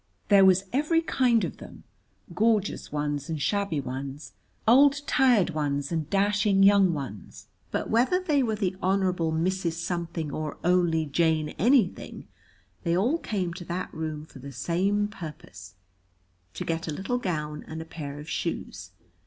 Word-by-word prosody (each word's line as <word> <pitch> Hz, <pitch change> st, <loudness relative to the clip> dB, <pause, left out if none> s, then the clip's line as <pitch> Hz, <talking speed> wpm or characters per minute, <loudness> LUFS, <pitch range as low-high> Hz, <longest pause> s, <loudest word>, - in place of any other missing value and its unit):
There 200 Hz, -2 st, +7 dB
was 190 Hz, 0 st, +5 dB
every 305 Hz, +5 st, +2 dB
kind 250 Hz, -8 st, +2 dB
of -, -, -4 dB
them, -, -, -12 dB, 0.5 s
gorgeous 215 Hz, -2 st, +1 dB
ones 145 Hz, -1 st, -2 dB
and 160 Hz, -2 st, -2 dB
shabby 200 Hz, -1 st, 0 dB
ones, 135 Hz, +2 st, -6 dB, 0.3 s
old 280 Hz, +4 st, +5 dB
tired 245 Hz, -12 st, +3 dB
ones 145 Hz, -2 st, -2 dB
and 160 Hz, -2 st, -2 dB
dashing 200 Hz, 0 st, +2 dB
young 200 Hz, -2 st, +6 dB
ones, 135 Hz, -, -7 dB, 0.2 s
but -, -, -2 dB
whether 250 Hz, +11 st, +2 dB
they 305 Hz, -6 st, +1 dB
were 225 Hz, -4 st, 0 dB
the 195 Hz, -3 st, -1 dB
Honorable 185 Hz, -3 st, +1 dB
Mrs. 170 Hz, +1 st, 0 dB
Something 170 Hz, -2 st, -3 dB
or 155 Hz, 0 st, -4 dB
only 175 Hz, -3 st, +2 dB
Jane 155 Hz, +1 st, +1 dB
Anything, 230 Hz, -, +1 dB, 0.5 s
they 170 Hz, -1 st, +1 dB
all 250 Hz, -, +1 dB
came 185 Hz, -, -2 dB
to 175 Hz, -1 st, -8 dB
that 180 Hz, +2 st, -4 dB
room 155 Hz, -1 st, -4 dB
for 145 Hz, -, -14 dB
the 140 Hz, +2 st, -9 dB
same 190 Hz, +10 st, 0 dB
purpose: 100 Hz, -, -10 dB, 0.8 s
to -, -, -4 dB
get 165 Hz, 0 st, -2 dB
a -, -, -2 dB
little 195 Hz, +11 st, -2 dB
gown 150 Hz, -7 st, -3 dB
and 160 Hz, -, -6 dB
a 160 Hz, -, -6 dB
pair 145 Hz, -3 st, -7 dB
of 150 Hz, -, -10 dB
shoes. 95 Hz, -, -4 dB
175 Hz, 155 wpm, -27 LUFS, 150-205 Hz, 0.8 s, There